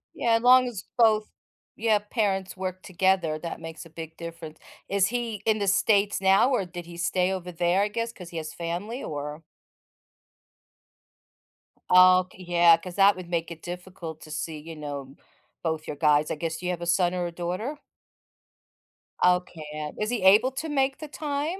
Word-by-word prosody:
Yeah, 235 - +1
as 230 - +1
long 255 +1 +6
as 225 -6 -6
both 220 -2 +4 0.5
Yeah, 220 -1 +2
parents 205 -3 -2
work 185 0 -5
together, 185 -4 +1
that 170 0 -6
makes 165 -1 -8
a - - -13
big 160 0 -9
difference. 165 -2 -9 0.3
Is 200 0 +2
he 230 -3 -3
in 220 -1 +3
The 200 -2 -1
States 200 0 +2
now 195 +7 +4
or 225 -7 +1
did 175 -1 -8
he 170 0 -11
stay 180 +2 +1
over 180 -1 -5
there, 175 +3 +1
I 205 - +2
guess, 230 +2 -3
'cause 180 -3 -10
he 170 - -7
has 155 -1 -5
family 180 +10 -4
or 150 +1 -5 2.5
Okay, 185 0 +5
yeah, 170 -1 +6
'cause 180 -2 -9
that 200 0 +6
would 180 -2 -9
make 170 -1 -2
it 165 -1 -9
difficult 175 -3 -8
to 155 - -11
see, 160 0 -4
you 160 +2 -9
know, 140 -2 -7 0.5
both 160 -1 -2
you 150 - -4
guys. 150 0 +3
I - - -1
guess, 160 +1 -3
do 180 - -9
you 180 - 0
have 175 -1 -4
a - - -3
son 175 +1 +2
or 180 -1 -1
a - - -6
daughter? 180 - -4 1.5
Okay. 180 -3 +1
Uh, 150 -1 -4
is 215 - 0
he 245 - -1
able 210 +7 +6
to 295 +5 -5
make 270 -2 +1
the 310 - -7
time, 300 +4 -3
180 Hz, 185 wpm, -26 LUFS, 165-210 Hz, 2.5 s, long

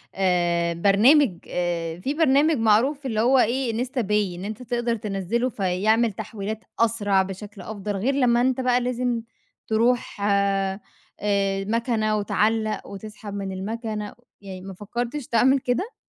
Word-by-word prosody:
آآ، 175 -2 +1
برنامج 205 - +4
آآ، 170 -1 -2
في 265 +10 -2
برنامج 300 0 +3
معروف 240 +6 +2
اللي 220 -4 0
هو 260 +2 +4
إيه 240 -1 +1
Instapay 210 -7 -1
إن 180 - -7
أنت 215 +4 -6
تقدر 240 -1 -1
تنزّله 210 +3 -2
فيعمل 215 +3 +1
تحويلات 215 +1 -5 0.2
أسرع، 205 -4 +2
بشكل 195 +2 -8
أفضل، 205 -1 -5
غير 230 +8 0
لمّا 240 -3 +3
أنت 260 +1 +1
بقى 250 0 +2
لازم 245 -1 -1 0.5
تروح 230 -1 +1
آآ، 200 -1 +1 0.9
مكنة، 220 -1 0
وتعلّق 215 +2 0
وتسحب 210 +1 -9
من 195 -1 -4
المكنة، 210 +2 -4 0.3
يعني 190 -2 -8
ما 195 +1 -8
فكّرتش 240 +7 -4
تعمل 260 +4 +4
كده؟ 255 - -2
220 Hz, 135 wpm, -24 LUFS, 195-245 Hz, 0.9 s, برنامج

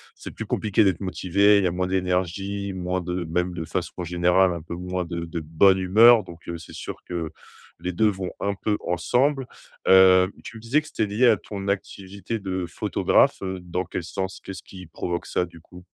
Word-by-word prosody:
c'est - - -9
plus - - -6
compliqué 110 0 +1
d'être 95 -4 +2
motivé, 100 +2 +3
il 100 - +2
y - - +3
a - - 0
moins 90 +1 -1
d'énergie, 95 +2 -1
moins 90 0 -2
de 90 0 -3
même 90 +2 -1
de 85 -2 -4
façon 90 +1 -4
générale 90 +2 +3
un 85 - -6
peu 85 +2 -7
moins 90 +1 -3
de 85 0 -4
de 85 0 -5
bonne 80 +5 +3
humeur, 110 +4 +6
donc, 85 -1 -13
heu, 85 - -4
c'est 80 - -12
sûr - - -6
que 85 -3 -4 0.5
les 90 - -3
2 110 +5 +2
vont 95 -3 -2
un 100 0 -1
peu 105 +2 -1
ensemble. 130 - +1 0.4
Heu, 95 0 +7
tu 115 - -9
me - - -11
disais 120 +7 +2
que 150 - -14
c'était 110 - -1
lié 105 +5 +2
à - - +5
ton 100 -1 -7
activité 100 +2 -4
de 95 -3 -3
photographe, - - +2
heu, 95 -1 -4
dans 90 +1 -2
quel 90 0 -5
sens? 95 +3 -4
Qu'est-ce 95 - -7
qui 95 -1 -12
provoque 85 +1 -4
ça 90 - 0
du 85 -1 -15
coup? 90 +2 -15
95 Hz, 210 wpm, -24 LUFS, 90-100 Hz, 0.5 s, Heu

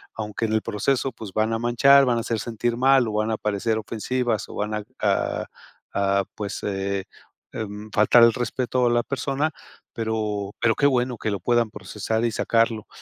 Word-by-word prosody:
aunque 110 0 -3
en 110 - -1
el 110 - +2
proceso, 125 +5 0
pues, 110 -4 -9
van 110 +1 +1
a 115 - -1
manchar, 135 +4 +5
van 120 -2 +2
a - - 0
hacer 115 -1 -2
sentir 120 +1 -2
mal, 130 -1 +4
o, 110 - -3
van 110 +1 0
a 110 - -1
parecer 105 +2 -1
ofensivas, 115 +1 -2
o, - - -9
van 105 +1 -2 0.3
a 100 -2 0 0.5
a, 100 0 +1
pues, 105 -1 -4
eh, 100 -1 -2 0.5
mm, 105 0 -6
faltar 110 +3 +6
el 115 -1 +6
respeto 125 +1 -1
a - - +4
la 120 0 +3
persona. 140 +3 -1 0.4
Pero 105 -3 -2
pero 115 -1 +3
qué 140 - +1
bueno 125 -2 0
que 110 - -2
lo 100 - -2
puedan 120 +2 +2
procesar 105 +3 -3
y 115 - +1
sacarlo. 115 -1 +1
110 Hz, 190 wpm, -24 LUFS, 105-120 Hz, 0.5 s, faltar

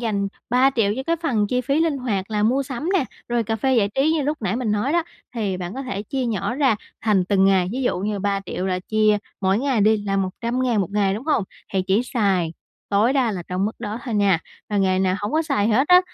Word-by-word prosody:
dành 205 -4 -1 0.2
3.000.000 250 -4 +3
cho 265 - -2
cái 335 +5 0
phần 225 -10 +1
chi 250 +4 0
phí 275 +5 0
linh 320 -4 +1
hoạt 210 -6 -2
là 210 -1 0
mua 255 +6 +2
sắm 275 +4 -4
nè, 365 - +3 0.2
rồi 240 -1 +1
cà 225 0 -2
phê 260 +4 +1
giải 205 -3 +3
trí 290 +4 +3
như 315 - +1
lúc 295 -1 -2
nãy 200 +1 0
mình 240 -4 -1
nói 210 +7 0
đó, 345 0 +3 0.3
thì 205 -5 -1
bạn 180 +3 -5
có 270 - -4
thể 205 -7 -4
chia 255 +4 -2
nhỏ 225 +1 -1
ra 265 -5 +2 0.2
thành 205 -5 +2
từng 190 0 +3
ngày. 190 -2 +3
Ví 260 +2 -2
dụ 245 - 0
như 205 +2 -2
3.000.000 195 -2 -2
là 185 -1 0
chia 215 +2 +2 0.2
mỗi 190 +1 +2
ngày 260 -3 +1
đi, 215 +2 +4
là 195 0 0
100.000 230 +5 0
một 195 - -2
ngày, 200 -1 +1
đúng 225 +7 -6
hông? 300 -10 +1 0.3
Thì 190 -1 +1
chỉ 195 +5 +2
xài 195 -9 0 0.4
tối 210 +6 +3
đa 260 -5 +2
là 180 -3 -4
trong 185 +2 -1
mức 215 - -1
đó 215 -1 -4
thôi 240 -4 -3
nha. 200 -4 +3 0.3
Và 210 - -1
ngày 190 -2 +2
nào 185 0 +1
hổng 205 - -3
có 315 +1 +2
xài 275 -10 0
hết 255 +6 +2
á, 360 0 +8
215 Hz, 255 wpm, -22 LUFS, 195-255 Hz, 0.4 s, á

